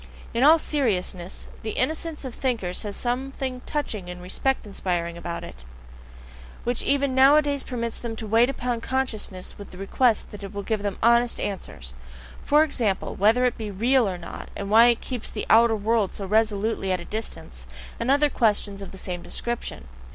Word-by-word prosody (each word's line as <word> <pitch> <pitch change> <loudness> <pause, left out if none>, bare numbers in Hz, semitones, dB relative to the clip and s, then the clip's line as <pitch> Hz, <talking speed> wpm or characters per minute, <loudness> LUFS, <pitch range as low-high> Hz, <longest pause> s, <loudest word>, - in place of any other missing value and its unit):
In 235 - 0
all 310 +3 +8
seriousness, 195 - -1
the 220 - -5
innocence 315 +2 -2
of 255 - -5
thinkers 225 -10 -2
has 205 -2 -4
something 255 +1 -3
touching 215 -11 -3
and 180 0 -7
respect 205 +10 -1
inspiring 175 -4 -2
in 170 - -10 0.2
it, 65 -2 -10 1.0
which 245 0 -1
even 280 -1 +1
nowadays 285 +2 +5
permits 235 -3 -4
them 230 -2 -4
to 220 - -6
wait 225 +4 +4
upon 245 -3 -2
consciousness 225 -9 -3
with 200 - -9
the 180 - -12
request 220 +4 +1
that 210 - -9
it 200 +1 -8
will 200 - -3
give 215 0 -1
them 200 -2 -2
HONEST 235 +1 +4
answers: 65 - -5 0.5
for 300 +2 +5
example, 230 -10 -1
whether 225 +5 +4
it 250 - 0
be 215 -2 -4
"real" 235 +3 +2
or 180 - -4
not, 170 - -8
and 200 0 -5
why 230 +2 +8
it 235 -1 +3
keeps 250 -4 -5
the 210 - -4
outer 230 0 +6
world 215 -1 +1
so 200 - -5
resolutely 210 -1 +1
at 185 - +1
a 170 - -8
distance, 65 - -5 0.3
and 230 - -1
other 285 +2 +5
questions 205 -4 +1
of 195 - -7
the 190 - -11
same 180 -2 -5
description. 235 - -4
225 Hz, 180 wpm, -25 LUFS, 195-255 Hz, 1.0 s, all